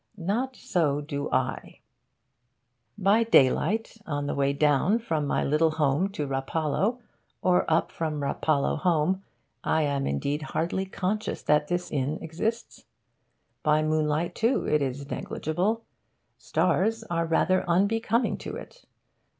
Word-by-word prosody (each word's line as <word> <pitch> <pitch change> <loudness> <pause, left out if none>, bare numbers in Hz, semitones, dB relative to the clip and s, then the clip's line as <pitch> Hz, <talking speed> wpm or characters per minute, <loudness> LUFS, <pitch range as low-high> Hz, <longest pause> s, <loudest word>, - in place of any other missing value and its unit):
Not 225 +9 -1
so 155 -11 0
do 145 -1 -4
I. - - -2 1.2
By 205 +4 +4
daylight, 220 - +3
on 145 -2 -2
the - - -2
way 140 0 +1
down 150 +8 +3
from 160 -11 -2
my - - +1
little 155 +3 +3
home 155 +4 +1
to 170 -8 -2
Rapallo, 150 - -1 0.5
or 180 -2 +3
up 160 - +2
from 155 -2 -3
Rapallo 140 +1 0
home, 180 +1 +1 0.4
I 160 - +2
am 140 -2 0
indeed 140 - -1
hardly 170 +5 -2
conscious 200 +3 -2
that 150 0 +3
this 175 +1 -2
inn 145 +1 -1
exists. 215 +9 -4 0.8
By 155 0 +3
moonlight, 155 +1 0
too, 230 +4 +1
it 150 -1 +2
is 140 +1 -3
negligible. 195 +9 -2 0.5
Stars 225 +1 +1
are 170 -5 -1
rather 185 +3 +2
unbecoming 225 +6 +1
to - - -6
it. - - -11
160 Hz, 130 wpm, -27 LUFS, 150-195 Hz, 1.2 s, By